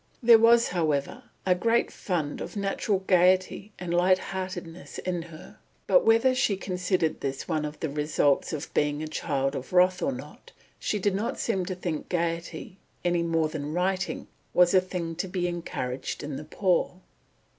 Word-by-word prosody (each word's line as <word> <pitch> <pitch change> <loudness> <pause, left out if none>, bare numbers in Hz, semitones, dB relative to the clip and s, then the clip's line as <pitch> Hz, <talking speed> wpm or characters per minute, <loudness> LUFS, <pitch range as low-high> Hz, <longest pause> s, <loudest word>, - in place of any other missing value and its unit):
There 230 -1 +8
was, 230 +1 +5
however, 155 -6 -1 0.2
a 185 - +4
great 230 +6 +1
fund 160 -6 -3
of - - -6
natural 200 -1 -1
gaiety 185 +2 +3
and 175 -1 -4
light 180 +2 +4
heartedness 185 -2 -6
in 180 -1 -2
her, 165 -1 -12 0.3
but - - +5
whether 230 +3 +4
she 215 -6 +1
considered 180 -3 -1
this 135 -1 -3
one 155 -3 -1
of 150 0 -7
the 160 - 0
results 150 -1 +1
of 155 -1 -5
being 145 +1 +1
a - - -4
child 140 -3 -1
of 135 +3 -6
wrath 180 0 +4
or 275 - +1
not, 260 - -10 0.3
she 210 - -1
did 205 0 +1
not 215 +5 -2
seem 190 -6 -1
to 185 - -3
think 175 -4 -4
gaiety, 170 +1 -3 0.3
any 175 -1 +2
more 165 -1 +1
than 150 -1 -5
writing, 185 +2 -1 0.3
was 180 0 +5
a 185 - +6
thing 180 -3 -4
to 190 - -2
be 180 -1 -1
encouraged 135 -7 -4
in 145 -1 -4
the 150 - -7
poor. 180 +2 0
180 Hz, 175 wpm, -27 LUFS, 155-190 Hz, 0.3 s, There